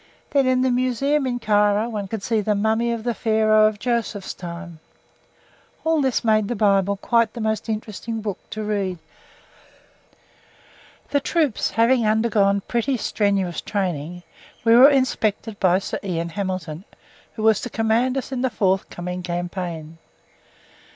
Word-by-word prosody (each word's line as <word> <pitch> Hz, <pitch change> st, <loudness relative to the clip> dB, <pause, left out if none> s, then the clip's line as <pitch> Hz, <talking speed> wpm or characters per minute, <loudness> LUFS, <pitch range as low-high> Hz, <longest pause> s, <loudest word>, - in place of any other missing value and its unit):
Then 275 Hz, -2 st, +3 dB
in 255 Hz, 0 st, +2 dB
the 260 Hz, -, +2 dB
museum 260 Hz, +3 st, +1 dB
in 245 Hz, -1 st, -1 dB
Cairo 210 Hz, -1 st, +2 dB
one 210 Hz, -4 st, -4 dB
could 215 Hz, 0 st, -5 dB
see 225 Hz, 0 st, +1 dB
the 210 Hz, 0 st, 0 dB
mummy 220 Hz, +3 st, +1 dB
of 230 Hz, -2 st, -3 dB
the 240 Hz, 0 st, 0 dB
Pharaoh 215 Hz, -1 st, +3 dB
of 215 Hz, -1 st, -2 dB
Joseph's 225 Hz, -3 st, -2 dB
time. 170 Hz, -1 st, -8 dB, 1.1 s
All 320 Hz, -1 st, +2 dB
this 265 Hz, -3 st, 0 dB
made 215 Hz, -2 st, +2 dB
the 240 Hz, -, -2 dB
Bible 200 Hz, -1 st, +2 dB
quite 230 Hz, +2 st, +1 dB
the 240 Hz, -, -7 dB
most 220 Hz, 0 st, -2 dB
interesting 220 Hz, +1 st, -4 dB
book 205 Hz, -3 st, -4 dB
to 215 Hz, -, -5 dB
read. 200 Hz, -4 st, -2 dB, 2.1 s
The 285 Hz, -, +3 dB
troops 295 Hz, -4 st, 0 dB
having 235 Hz, +2 st, +3 dB
undergone 215 Hz, -2 st, +2 dB
pretty 245 Hz, +5 st, -1 dB
strenuous 200 Hz, -5 st, 0 dB
training, 175 Hz, -4 st, -3 dB, 0.4 s
we 230 Hz, 0 st, +6 dB
were 260 Hz, +4 st, +9 dB
inspected 225 Hz, -6 st, 0 dB
by 185 Hz, -2 st, +4 dB
Sir 195 Hz, -, -4 dB
Ian 170 Hz, -3 st, -2 dB
Hamilton, 185 Hz, -3 st, -4 dB, 0.5 s
who 215 Hz, -, -5 dB
was 220 Hz, -2 st, +4 dB
to 245 Hz, -, -5 dB
command 235 Hz, +4 st, +1 dB
us 270 Hz, -, -4 dB
in 255 Hz, -2 st, -2 dB
the 260 Hz, -, +1 dB
forthcoming 185 Hz, -3 st, -1 dB
campaign. 175 Hz, -2 st, -5 dB
215 Hz, 150 wpm, -22 LUFS, 195-235 Hz, 2.1 s, were